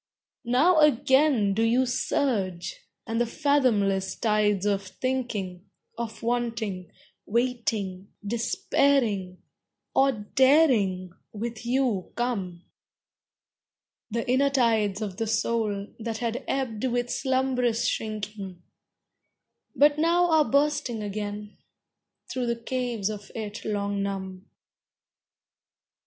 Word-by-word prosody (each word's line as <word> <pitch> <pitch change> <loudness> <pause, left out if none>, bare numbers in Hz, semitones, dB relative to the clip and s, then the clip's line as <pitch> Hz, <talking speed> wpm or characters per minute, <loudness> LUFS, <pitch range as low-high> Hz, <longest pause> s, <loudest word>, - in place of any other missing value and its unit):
Now 315 +8 +4
again 265 -6 +4
do 220 - 0
you 235 +3 +3
surge. 240 - -1 0.3
And 230 0 -1
the 240 - +1
fathomless 225 -9 +1
tides 210 -3 +1
of 200 -1 +1
thinking, 200 -4 -4 0.3
Of 230 -1 -6
wanting, 230 -6 -2 0.4
waiting, 220 -5 -1 0.2
despairing 225 -3 +1 0.5
or 270 0 +4
daring 215 - +3 0.2
with 230 +2 -5
you 245 -7 0
come; 195 -8 -3 1.5
The 230 +3 -3
inner 265 +3 +3
tides 220 -6 +1
of 195 -3 -5
the 225 -1 -2
soul, 220 -2 0
that 225 0 -3
had 235 +2 -3
ebbed 250 -5 -2
with 245 -1 -1
slumberous 260 -3 0
shrinking, 210 -4 -4 1.1
But 290 +1 +4
now 340 +2 +3
are 315 -2 +5
bursting 280 -5 +1
again, 210 0 -5 0.7
thro 255 -1 -3
the 235 - +1
caves 235 -3 -2
of 205 -1 -9
it 215 -1 -5
long 200 -1 -1
numb. 190 -1 -5
230 Hz, 100 wpm, -26 LUFS, 205-255 Hz, 1.5 s, are